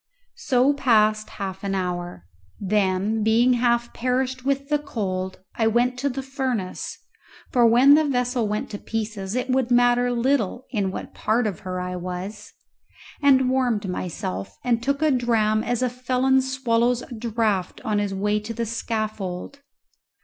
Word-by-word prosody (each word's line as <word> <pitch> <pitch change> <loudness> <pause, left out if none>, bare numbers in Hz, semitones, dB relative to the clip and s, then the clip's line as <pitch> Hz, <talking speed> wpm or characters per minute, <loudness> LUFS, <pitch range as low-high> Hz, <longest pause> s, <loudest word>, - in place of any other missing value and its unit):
So 260 +2 +4
passed 215 -5 +2
half 195 -2 -6
an 195 -1 -1
hour; 175 - -4 0.3
then, 200 +1 +1
being 230 +4 +4
half 240 -1 +1
perished 255 +1 -1
with 275 +1 -1
the 295 0 +2
cold, 190 -9 -4
I 225 - +1
went 245 +2 +1
to 280 +2 0
the 270 +1 -4
furnace, 260 -8 -3 0.5
for 240 -3 +5
when 250 +5 +7
the 310 +1 +5
vessel 250 -4 0
went 210 +1 -3
to 205 - -5
pieces 215 -2 -4
it 255 +1 -1
would 255 -1 +1
matter 245 0 +4
little 245 -1 0
in 205 -6 0
what 190 - -7
part 225 +3 0
of 200 -6 -2
her 185 -1 -4
I 180 0 -4
was, 185 +4 -6 0.7
and 265 -2 +5
warmed 245 -6 +1
myself 100 - -4
and 235 -2 +1
took 280 +4 0
a 310 - +4
dram 225 -4 +2
as 245 0 -1
a 250 - +2
felon 255 +1 +2
swallows 245 -2 +1
a - - -10
draught 220 -4 -1
on 210 -1 0
his 205 -1 -1
way 210 +2 +1
to 220 +2 -7
the 235 0 -2
scaffold. 215 0 -4
230 Hz, 160 wpm, -24 LUFS, 205-255 Hz, 0.7 s, when